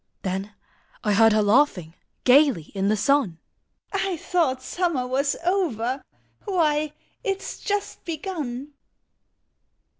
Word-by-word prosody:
Then 195 Hz, +2 st, -3 dB, 0.5 s
I 210 Hz, -, +2 dB
heard 225 Hz, +2 st, +6 dB
her 215 Hz, 0 st, +3 dB
laughing 205 Hz, -, +3 dB, 0.3 s
Gaily 255 Hz, -, +4 dB
in 195 Hz, -1 st, 0 dB
the 215 Hz, +1 st, +2 dB
sun, 215 Hz, -, +2 dB, 0.3 s
" -, -, -48 dB
I 380 Hz, -3 st, 0 dB
thought 300 Hz, -7 st, 0 dB
Summer 335 Hz, -5 st, -1 dB
was 270 Hz, +3 st, 0 dB
over: 275 Hz, -, 0 dB, 0.4 s
Why, 310 Hz, -6 st, +1 dB, 0.3 s
it 390 Hz, -4 st, 0 dB
\s -, -, -7 dB
just 410 Hz, -1 st, -3 dB
begun 300 Hz, -6 st, -5 dB
275 Hz, 120 wpm, -24 LUFS, 215-330 Hz, 0.5 s, heard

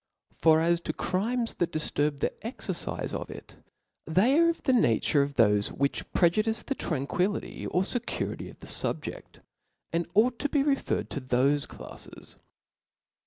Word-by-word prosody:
For 160 Hz, -1 st, +4 dB
as 170 Hz, +1 st, +2 dB
to -, -, -3 dB
crimes 230 Hz, +5 st, -1 dB
that 175 Hz, -1 st, +1 dB
diflurb 150 Hz, -2 st, -1 dB
the -, -, +1 dB
exercife 230 Hz, +4 st, -4 dB
of -, -, -4 dB
it, -, -, -11 dB, 0.5 s
they 225 Hz, -, +4 dB
are 335 Hz, 0 st, +5 dB
of 335 Hz, -, -3 dB
the 260 Hz, -, +3 dB
nature 145 Hz, -, +3 dB
of 140 Hz, 0 st, -2 dB
thofe 105 Hz, -4 st, +4 dB
which 140 Hz, +1 st, -1 dB
jMTCjudiGc 215 Hz, +6 st, +2 dB
the 275 Hz, -, -1 dB
tranquillity 180 Hz, -, -2 dB
^or 180 Hz, -, +1 dB
fecurity 240 Hz, +4 st, -3 dB
of -, -, -14 dB
the -, -, -10 dB
fubjeA, -, -, -2 dB, 0.7 s
and 170 Hz, +1 st, -1 dB
ou^ 235 Hz, +4 st, +4 dB
to 290 Hz, -, 0 dB
be 285 Hz, -1 st, +2 dB
referred 280 Hz, -1 st, 0 dB
to 140 Hz, -, -3 dB
thofe 130 Hz, +3 st, +2 dB
dafles. -, -, -9 dB
175 Hz, 155 wpm, -28 LUFS, 145-235 Hz, 0.7 s, are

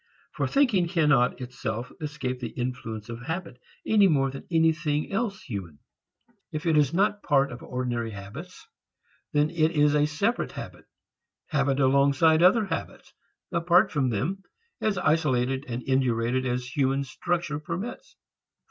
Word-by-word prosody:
For -, -, -1 dB
thinking 245 Hz, -11 st, +3 dB
cannot 150 Hz, -8 st, +2 dB
itself 125 Hz, -2 st, -5 dB
escape 145 Hz, -4 st, -4 dB
the 120 Hz, -2 st, -4 dB
influence 110 Hz, -4 st, -4 dB
of 115 Hz, 0 st, -7 dB
habit, 160 Hz, -2 st, -5 dB, 0.3 s
any 210 Hz, -3 st, +5 dB
more 135 Hz, -5 st, +2 dB
than 135 Hz, -, -9 dB
anything 160 Hz, -2 st, +1 dB
else 200 Hz, -1 st, -2 dB
human. 95 Hz, -, -6 dB, 0.7 s
If 155 Hz, +1 st, -5 dB
it 165 Hz, -2 st, +3 dB
is 145 Hz, -3 st, +4 dB
not 200 Hz, +4 st, +2 dB
a -, -, -19 dB
part 140 Hz, -1 st, +3 dB
of 125 Hz, -, -8 dB
ordinary 120 Hz, -2 st, -3 dB
habits, 110 Hz, -, -9 dB, 0.7 s
then 150 Hz, 0 st, +2 dB
it 165 Hz, -1 st, +1 dB
is 150 Hz, -1 st, +4 dB
a 150 Hz, 0 st, +3 dB
separate 200 Hz, +10 st, -1 dB
habit, -, -, -9 dB, 0.6 s
habit 140 Hz, -4 st, +1 dB
alongside 140 Hz, +4 st, +4 dB
other 200 Hz, +5 st, +5 dB
habits, 195 Hz, -, -6 dB, 0.4 s
apart 170 Hz, +1 st, +3 dB
from 135 Hz, -4 st, +1 dB
them, 155 Hz, -, -2 dB, 0.4 s
as 215 Hz, -3 st, 0 dB
isolated 135 Hz, -6 st, +1 dB
and 120 Hz, 0 st, -4 dB
indurated 130 Hz, -1 st, +1 dB
as 125 Hz, 0 st, -1 dB
human 135 Hz, -1 st, +1 dB
structure 165 Hz, +2 st, -2 dB
permits. 180 Hz, +10 st, -6 dB
145 Hz, 145 wpm, -26 LUFS, 125-170 Hz, 0.7 s, any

